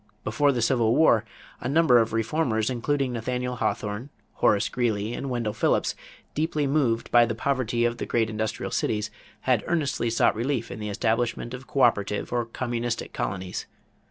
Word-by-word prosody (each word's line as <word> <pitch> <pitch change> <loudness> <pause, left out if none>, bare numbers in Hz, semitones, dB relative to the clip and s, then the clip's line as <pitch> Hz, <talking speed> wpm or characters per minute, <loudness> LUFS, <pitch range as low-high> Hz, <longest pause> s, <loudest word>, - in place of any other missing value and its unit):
Before 140 +7 +2
the 120 -4 0
Civil 115 -2 +3
War, 115 -8 +4 0.3
a 120 - -3
number 145 -4 +5
of 115 -1 +1
reformers, 115 0 0
including 130 +1 0
Nathaniel 125 +2 -2
Hawthorne, 105 +6 -2 0.2
Horace 100 - +3
Greeley, 115 -3 -1
and 140 - -4
Wendell 120 -4 -1
Phillips, 105 - +1 0.4
deeply 155 -1 0
moved 135 -5 +1
by 120 0 +7
the 115 - -2
poverty 120 -2 0
of 120 0 0
the - - -3
great 115 -2 +1
industrial 110 0 -3
cities, 105 -1 -1 0.3
had - - +2
earnestly 145 -8 0
sought 115 - +3
relief 120 0 -2
in - - -6
the 105 0 -4
establishment 115 +3 -1
of 130 +1 -8
coöperative 105 -6 +1
or 120 -1 0
communistic 120 0 -3
colonies. 95 -1 -4
120 Hz, 160 wpm, -26 LUFS, 110-130 Hz, 0.4 s, by